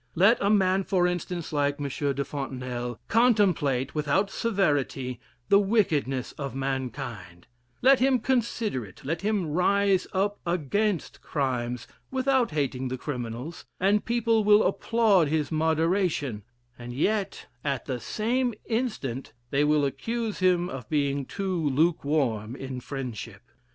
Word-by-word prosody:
Let 200 +8 +5
a 200 - +2
man, 195 -2 +3
for 180 -2 +2
instance, 175 -2 -3
like 145 -1 +1
M. 145 - -2
de 140 0 -1
Fontenelle, 125 -4 -4
contemplate, 185 - +3
without 150 +7 +1
severity, 145 - 0 0.3
the 200 - +7
wickedness 160 - +1
of 140 -2 -4
mankind; 130 -9 -4 0.4
let 270 +1 +6
him 260 +1 +4
consider 230 - 0
it, 95 +3 -14
let 165 +4 -2
him 205 -3 0
rise 195 +3 +2
up 200 +2 0
against 175 +3 -1
crimes 125 -4 -2 0.2
without 260 -1 +2
hating 135 -4 -1
the 130 +1 -3
criminals, 125 +3 -5 0.2
and 200 +3 +3
people 230 -2 +2
will 210 +1 +6
applaud 215 -8 +3
his 150 -2 -1
moderation; 160 - +1 0.4
and 120 0 -7
yet, 200 - -1 0.2
at 140 -3 -2
the 130 -3 -3
same 240 - -1
instant, 210 - -3 0.2
they 140 +1 +3
will 150 -1 +3
accuse 225 - -3
him 180 -1 +3
of 135 -8 -7
being 140 -2 0
too 185 -6 -1
lukewarm 140 -7 +1
in 135 -2 -6
friendship. 120 -6 -6
155 Hz, 130 wpm, -27 LUFS, 135-200 Hz, 0.4 s, the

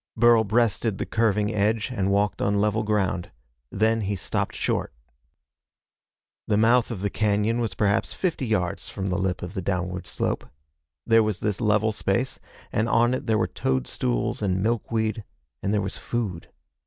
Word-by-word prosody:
Burl 120 -1 +6
breasted 110 -1 +1
the - - -2
curving 105 -1 +1
edge, 110 +4 +1
and 100 -6 0
walked 100 +1 +1
on 100 0 +2
level 105 +1 +1
ground. 100 -4 0 0.4
Then 110 +5 +1
he 100 0 -1
stopped 85 - -2
short. - - -1 1.6
The 105 - +2
mouth 115 +2 +4
of 110 -6 -5
the 100 - -1
cañon 105 +2 +1
was 110 -5 -2
perhaps 100 +1 +1
fifty 170 -8 -2
yards 90 -6 -1
from 95 0 -4
the 90 +1 0
lip 95 -1 -1
of 90 +1 -6
the 95 - -3
downward 90 -1 -2
slope. - - -2 0.6
There 115 0 +5
was 105 -4 -1
this 105 -1 -2
level 110 0 +3
space, 110 +5 -1 0.3
and 110 +2 0
on 120 +1 +3
it 130 +1 -3
there 110 -1 +3
were 110 - +2
toadstools 60 - -1
and 95 -2 0
milkweed, 110 -1 -1 0.4
and 100 - -1
there 105 -1 +2
was 95 - -4
food. 100 -8 -3
105 Hz, 165 wpm, -25 LUFS, 95-115 Hz, 1.6 s, Burl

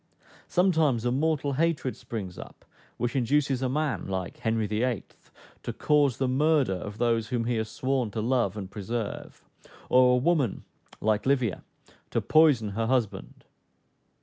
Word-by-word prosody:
Sometimes 160 - +2
a 120 - +2
mortal 145 +1 0
hatred 150 -3 0
springs 95 -6 -7
up, - - -12 0.3
which 120 +2 -2
induces 135 +1 +1
a 130 - 0
man, 150 +1 -1
like 95 -2 -4
Henry 110 -1 0
VIII., 110 +2 -1 0.6
to - - -4
cause 145 -5 +2
the 135 - 0
murder 140 -3 +2
of 100 +3 -6
those 115 -2 +1
whom 120 -2 -1
he 120 -1 0
has 110 0 -2
sworn 130 -3 -1
to 110 - -5
love 115 -3 0
and 95 -2 -6
preserve; 110 +1 -5 0.4
or 125 0 +5
a - - +2
woman, 140 - +1 0.4
like 110 +2 +1
Livia, 130 -7 +1 0.5
to - - 0
poison 150 -9 +4
her 110 +3 -2
husband. 120 -4 -2
125 Hz, 150 wpm, -27 LUFS, 110-140 Hz, 0.6 s, or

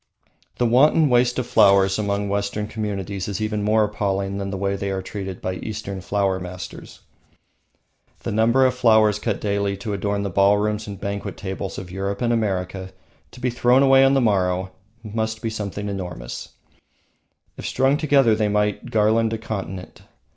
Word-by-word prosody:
The 120 - +1
wanton 145 +6 +4
waste 125 0 +3
of 125 - -1
flowers 100 -4 +4
among 100 -1 -1
Western 100 +1 -2
communities 100 -3 -4
is 100 -1 -3
even 110 -1 -1
more 110 +1 +3
appalling 100 -1 -2
than 100 0 -3
the 95 - -4
way 100 +1 -1
they 100 0 -3
are 95 -1 -3
treated 95 -2 -6
by 95 0 -2
Eastern 100 -3 -5
Flower 95 -1 0
Masters. 90 0 -9 1.2
The - - -4
number 115 +5 +3
of 130 - +3
flowers 110 -4 +4
cut 105 -2 -2
daily 100 -1 -1
to 105 +2 -4
adorn 100 0 -1
the 100 - -3
ballrooms 105 +3 +2
and 100 -2 -7
banquet 100 0 -4
tables 95 -1 -5
of 90 -2 -7
Europe 100 +4 -3
and 120 0 +2
America, 95 -3 -2 0.4
to - - -14
be 125 0 -1
thrown 125 +2 +4
away 135 0 +6
on 135 +1 +4
the 135 - +3
morrow, 95 -4 +1 0.3
must 110 0 -3
be 115 -1 -3
something 105 -2 -4
enormous; 90 -11 -6 1.1
if - - -6
strung 135 +2 +2
together 140 -6 +3
they 105 -1 +1
might 105 0 0
garland 110 +1 +2
a - - -1
continent. 95 -5 -6
105 Hz, 170 wpm, -22 LUFS, 100-110 Hz, 1.2 s, away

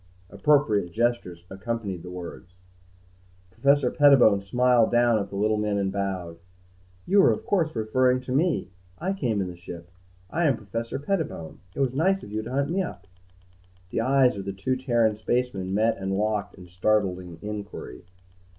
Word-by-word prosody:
Appropriate 105 -5 +2
gestures 110 -6 -1
accompanied 100 -1 -4
the 90 - -9
words. 90 +1 -9 1.0
Professor 140 +5 +2
Pettibone 135 -9 +5
smiled 120 +2 +3
down 120 -2 +4
at 100 - -4
the - - -8
little 105 +2 +1
men 105 -1 0
and 95 -1 0
bowed. 95 -4 -4 0.7
"You 195 +2 +5
are - - +6
of 220 - -3
course 165 -6 0
referring 125 +4 +2
to 130 - -7
me. 155 - +1 0.3
I 190 +4 -2
came 120 - -1
in 95 - -2
the 90 - -7
ship. 85 0 -10 0.4
I 170 +1 +1
am 140 -6 +3
Professor 115 +3 -5
Pettibone. 145 - -3 0.2
It - - -2
was 130 -2 +1
nice 190 +7 +1
of - - -10
you 110 +1 -2
to 110 - -8
hunt 140 +3 0
me 190 +2 +1
up." 125 - -6 0.9
The - - 0
eyes 130 0 +3
of 100 -1 -6
the 100 - -3
two 100 +7 -1
Terran 120 -5 +1
spacemen 110 -4 -1
met 110 +3 +2
and 95 0 -2
locked 105 -1 -1
in 90 - -12
startled 90 +1 +1
inquiry. 90 -5 -8
110 Hz, 170 wpm, -26 LUFS, 95-130 Hz, 1.0 s, are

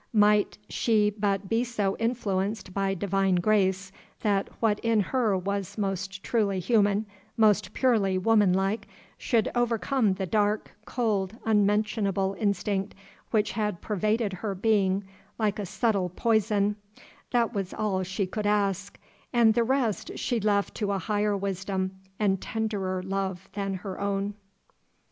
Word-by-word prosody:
Might 210 0 +4
she 210 -3 +2
but 200 -1 -1
be 225 +4 +1
so 210 -5 -1
influenced 210 -4 -1
by 195 0 0
divine 195 0 +1
grace, 190 0 +1 0.3
that 200 -2 +1
what 215 -2 +2
in 230 -1 +2
her 215 -1 +1
was 200 +1 -3
most 195 -1 -3
truly 205 -5 +1
human, 205 +1 +2 0.3
most 210 -3 +3
purely 215 -8 +2
woman 210 0 +4
like, 195 +4 0 0.3
should 230 -4 +1
overcome 240 -1 +1
the 190 0 -2
dark, 205 +3 0
cold, 215 -4 -1
unmentionable 205 -2 +1
instinct 200 -1 -1 0.3
which 215 -2 +1
had 210 -3 -2
pervaded 210 +1 0
her 195 +2 -3
being 195 -1 +2 0.3
like 215 -2 0
a 200 - -3
subtile 195 -1 0
poison 210 +1 +1 0.5
that 240 -1 +1
was 195 -3 -3
all 200 -3 -1
she 190 +2 -2
could 205 +3 -3
ask, 200 -1 0 0.3
and 235 -3 +5
the 235 - +2
rest 230 -4 0
she 240 -3 0
left 205 -1 +1
to 205 -2 -2
a 200 - 0
higher 205 +1 0
wisdom 190 -1 -2 0.3
and 195 -3 +1
tenderer 200 -4 -2
love 190 -1 -3
than 195 -1 -2
her 185 0 -6
own. 200 0 -1
205 Hz, 140 wpm, -27 LUFS, 195-220 Hz, 0.5 s, and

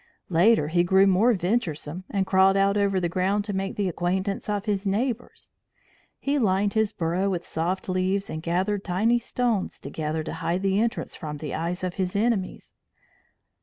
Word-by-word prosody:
Later, 175 -2 +4
he 175 +2 +3
grew 190 +2 +5
more 195 +5 +4
venturesome, 180 -4 -2
and 195 -1 0
crawled 190 +1 +4
out 195 +1 +3
over 200 -2 +2
the 175 - 0
ground 190 +4 0
to 205 - -4
make 195 0 -2
the 200 -2 0
acquaintance 185 +4 -2
of 205 0 -1
his 200 -2 -1
neighbours. 235 +4 -2 0.6
He 285 +1 0
lined 200 -2 +2
his 220 -1 +1
burrow 180 +2 -1
with 175 -3 -3
soft 175 +4 -2
leaves 185 +1 0
and 155 - -5
gathered 190 +4 -1
tiny 215 +6 +2
stones 235 -4 -1
together 155 0 -3
to - - -5
hide 175 +3 -2
the 195 0 +2
entrance 230 +2 -1
from 150 -2 -6
the 150 -2 -6
eyes 175 +3 -3
of 180 -1 -2
his 185 +2 -2
enemies. 205 -3 -1
190 Hz, 175 wpm, -25 LUFS, 175-205 Hz, 0.6 s, grew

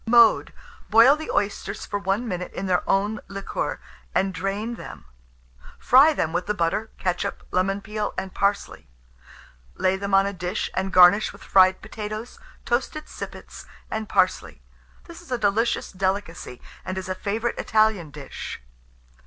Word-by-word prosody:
Mode. 235 -1 +5 0.4
Boil 230 +6 +7
the 315 +1 -8
oysters 200 0 -2
for 205 - -3
1 200 +5 -1
minute 180 -3 -4
in 195 - -4
their 180 -2 +2
own 205 +3 +1
liquor, 195 0 -4 0.4
and 190 0 +1
drain 195 +5 -3
them; 235 - -10 0.7
fry 275 +5 +6
them 165 - -1
with 180 +2 -1
the 210 - 0
butter, 190 +5 -1
ketchup, 180 -1 -2
lemon 195 +2 0
peel, 215 0 -3
and 190 -1 -4
parsley; 200 0 -1 0.9
lay 185 0 +1
them 200 0 0
on 195 0 +5
a 200 - -2
dish, 180 +2 -3
and 190 +1 -2
garnish 185 +3 +6
with - - -15
fried 185 -1 +4
potatoes, 215 - -6 0.3
toasted 265 +5 -1
sippets, - - -9 0.2
and 220 -1 -3
parsley. - - 0 0.4
This 340 0 -12
is 345 - -16
a 250 - +1
delicious 220 +2 0
delicacy, 190 -8 -3 0.2
and 185 - -5
is 190 - -4
a 185 - -1
favourite 215 +5 -2
Italian 215 -7 +2
dish. 145 -2 -8
200 Hz, 155 wpm, -24 LUFS, 185-220 Hz, 0.9 s, Boil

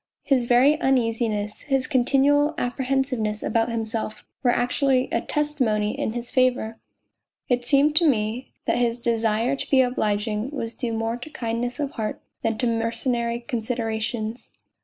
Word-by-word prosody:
His 255 -4 +2
very 260 +5 +5
uneasi 235 -4 +2
ness, 210 0 -4
his 270 -3 0
continual 285 +3 +3
apprehensive 260 +1 -1
ness 215 -1 -2
about 225 +1 +1
himself, 225 -1 -3 0.2
were 250 - +2
actually 255 +2 +2
a - - +1
testimony 255 -8 0
in 280 -6 -2
his 240 0 -5
favour. 250 -4 +1 0.7
It 245 -1 0
seemed 290 +2 +4
to 340 -1 +6
me 230 -1 0
that - - +1
his 235 -1 +1
desire 230 +1 +1
to - - -5
be 265 -2 +5
obliging 215 -1 -1
was 235 -6 -4
due 235 -3 -3
more 225 +1 -1
to 250 +5 -9
kindness 240 0 -3
of 285 -2 -2
heart 215 -2 -4 0.2
than 225 -1 0
to 245 - 0
mer 230 -1 +1
cenary 235 0 -2
considerations. 225 -1 -3
240 Hz, 160 wpm, -24 LUFS, 225-265 Hz, 0.7 s, to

